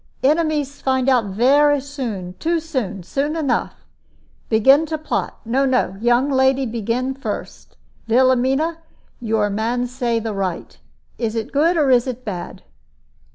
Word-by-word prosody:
"Enemies 295 -1 +1
find 260 -1 0
out 250 -4 +3
vere 280 +8 +3
soon, 245 -10 -5
too 335 +1 0
soon, 260 - -4
soon 285 - -2
enough. 290 -6 -2 0.6
Begin 270 +8 +5
to 315 0 -2
plot 310 - -3
no, 255 +5 +1
no, 255 -7 +1
young 240 +4 +2
lady 265 0 +3
begin 235 +3 -2
first. 270 +1 -7 0.3
Vilhelmina, 260 +7 +2 0.4
your 220 -3 0
man 230 +4 -1
say 245 -2 -1
the 225 -1 -3
right. 190 -3 -4 0.4
Is 230 -2 -2
it 225 -1 -3
good, 330 +5 +2
or 285 -4 +3
is 245 0 +4
it 255 0 -5
bad?" 185 -5 -6
255 Hz, 140 wpm, -20 LUFS, 230-285 Hz, 0.6 s, Begin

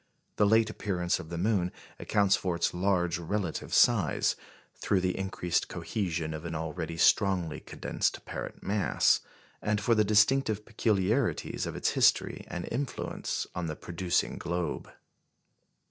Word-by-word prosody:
The 105 - +4
late 110 +1 +4
appearance 90 -5 -1
of 80 - -9
the 85 - -4
moon 90 -1 +1 0.3
accounts 100 -2 +3
for 90 -2 -2
its 85 - 0
large 90 -2 +1
relative 85 0 -3
size 105 - +3 0.4
through 95 - 0
the 90 0 0
increased 95 -3 -1
cohesion 85 -6 -3
of 80 0 -6
an 85 -1 -4
already 80 +1 -4
strongly 90 -3 +3
condensed - - -3
parent - - -6
mass 100 +1 +2 0.4
and 105 0 0
for 115 +3 +2
the 110 -1 +4
distinctive 110 +1 +3
peculiarities 110 +2 0
of - - -5
its - - +1
history - - +2
and 85 - -5
influence 135 +3 -3
on 90 -2 -3
the 80 - -4
producing 85 +2 -1
globe. 85 -2 -3
95 Hz, 140 wpm, -29 LUFS, 85-105 Hz, 0.4 s, The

